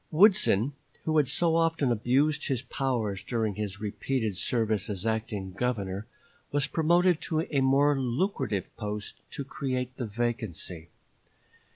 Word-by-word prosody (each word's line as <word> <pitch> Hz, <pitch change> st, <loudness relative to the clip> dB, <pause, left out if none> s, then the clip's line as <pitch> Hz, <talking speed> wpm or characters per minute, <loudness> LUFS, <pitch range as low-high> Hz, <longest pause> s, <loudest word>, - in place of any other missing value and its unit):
Woodson, 155 Hz, -, +5 dB, 0.3 s
who 155 Hz, 0 st, +1 dB
had 145 Hz, -3 st, +4 dB
so 165 Hz, +5 st, +2 dB
often 165 Hz, -5 st, +2 dB
abused 135 Hz, +7 st, +2 dB
his 130 Hz, -3 st, -1 dB
powers 120 Hz, -7 st, -1 dB
during 110 Hz, -4 st, -1 dB
his 100 Hz, 0 st, -4 dB
repeated 110 Hz, +1 st, -2 dB
service 110 Hz, +1 st, +1 dB
as 100 Hz, 0 st, -1 dB
acting 110 Hz, -4 st, -2 dB
Governor, 100 Hz, -3 st, -2 dB, 0.4 s
was 145 Hz, -1 st, +2 dB
promoted 170 Hz, +2 st, +3 dB
to 160 Hz, -1 st, 0 dB
a 145 Hz, -4 st, 0 dB
more 140 Hz, +2 st, +4 dB
lucrative 125 Hz, -, -1 dB
post 105 Hz, -1 st, -5 dB
to 140 Hz, -, -5 dB
create 130 Hz, -2 st, -3 dB
the 120 Hz, -, -3 dB
vacancy. 105 Hz, -7 st, -3 dB
125 Hz, 135 wpm, -28 LUFS, 105-145 Hz, 0.4 s, Woodson